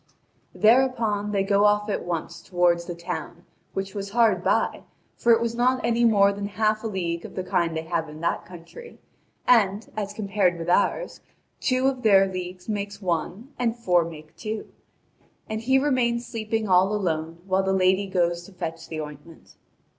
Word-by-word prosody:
Thereupon, 225 -3 +3
they 200 -1 +1
go 200 +1 +3
off 210 0 +3
at 205 - -2
once 170 0 -4
toward 175 -1 +2
the 170 0 -6
town, 170 0 -6 0.3
which 195 0 -4
was 200 -1 -5
hard 215 -5 +3
by, - - +1 0.3
for 235 - +2
it 230 - +6
was 235 0 -1
not 250 +2 +2
any 235 0 +2
more 200 -3 +5
than 200 0 -4
half 215 +1 0
a - - -1
league 170 -5 -3
of - - -10
the 185 - -2
kind 165 -2 0
they 160 - -3
have 160 -1 -2
in 155 +1 -10
that 170 - -1
country; 185 - -12 0.5
and, 215 -3 +3
as 205 -2 -3
compared 195 -4 0
with 165 0 -5
ours, - - +1 0.4
two 255 0 +1
of 265 -2 +1
their 195 -4 +6
leagues 185 -1 -6
make 205 -2 -3
one 195 - -3
and 235 -2 +1
four 180 -7 +2
make 155 -1 -10
two. 215 +4 -5 0.8
And 220 0 -3
he 265 +3 +3
remains 250 -4 +1
sleeping 220 -1 -3
all 190 +2 +4
alone, 165 -4 -2
while 190 0 +2
the 190 0 0
lady 190 +1 +2
goes 175 -2 0
to - - -15
fetch 165 -2 -6
the 160 - -5
ointment. 150 +2 -10
200 Hz, 180 wpm, -25 LUFS, 175-225 Hz, 0.8 s, it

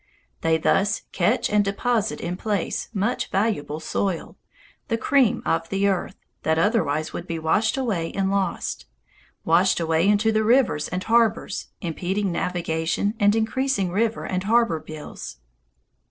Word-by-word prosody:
They 165 0 +3
thus 195 +5 +1
catch 175 - +1
and 210 0 +3
deposit 220 +2 0
in 175 +1 -3
place 200 -2 -2
much 215 +3 -1
valuable 190 -7 -1
soil, 175 +2 -2 0.5
the 230 - 0
cream 260 0 +2
of 165 0 0
the 195 +1 +1
earth, 195 -2 -1 0.3
that 160 0 +1
otherwise 160 -6 +1
would 175 - -6
be 165 - -3
washed 200 +10 +1
away 200 -11 -1
and 195 0 0
lost, 195 - -2 0.6
washed 175 +4 +3
away 165 +3 +2
into 210 +2 +3
the 220 0 +2
rivers 225 - +3
and 180 +1 -3
harbors, 230 -1 +1
impeding 185 +3 -2
navigation 170 +3 -1
and 205 +1 +4
increasing 225 -4 0
river 220 +4 0
and 185 0 -2
harbor 225 -6 +3
bills. 155 - -9
195 Hz, 140 wpm, -24 LUFS, 165-220 Hz, 0.6 s, and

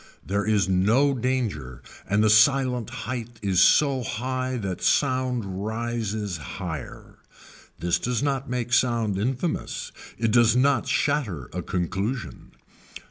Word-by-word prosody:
There 100 +2 -1
is 105 -4 +2
no 110 +10 +3
danger 110 - -2 0.3
and 100 +2 +3
the 110 - +4
silent 125 +1 +4 0.2
height 120 -1 -5
is 95 -3 +3
so 140 -3 +4
high 130 +2 -3
that 95 -5 -4
sound 125 -8 0
rises 110 -3 -3
higher. 80 0 -7 0.6
This 85 0 0
does 125 +2 -1
not 135 -2 -1
make 120 -1 -2
sound 115 -6 +2
infamous, 130 - -2 0.3
it 115 0 0
does 120 0 +5
not 130 -2 +2
shatter 110 - -1
a - - -3
conclusion. 95 +7 -3
115 Hz, 125 wpm, -25 LUFS, 100-130 Hz, 0.6 s, does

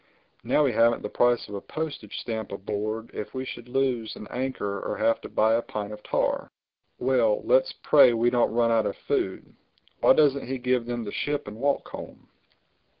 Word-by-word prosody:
Now 150 - +3
we 135 - +2
haven't 115 +1 +3
the - - -3
price 120 -1 +2
of 105 - -10
a 100 - -4
postage 155 -10 -5
stamp 110 -3 -4
aboard 105 +3 -4
if 105 +2 -6
we 130 0 -3
should 120 -1 -8
lose 125 -4 0
an - - -9
anchor 125 -6 -3
or - - -4
have 115 - +2
to - - -8
buy 110 +1 +3
a 115 - +2
pint 105 -2 -5
of 105 - -10
tar—Well, - - -1
let's - - +3
pray 140 -4 +7
we 120 +1 +2
don't 120 -2 +2
run 115 0 +2
out 115 -1 +3
of - - -4
food—Why - - -1
doesn't 140 -4 +3
he 135 +1 -2
give 125 -1 0
them 120 -1 -3
the 105 - -6
ship 145 -4 -2
and 105 - -7
walk 140 +3 0
home?" - - -10
120 Hz, 190 wpm, -26 LUFS, 110-135 Hz, -, pray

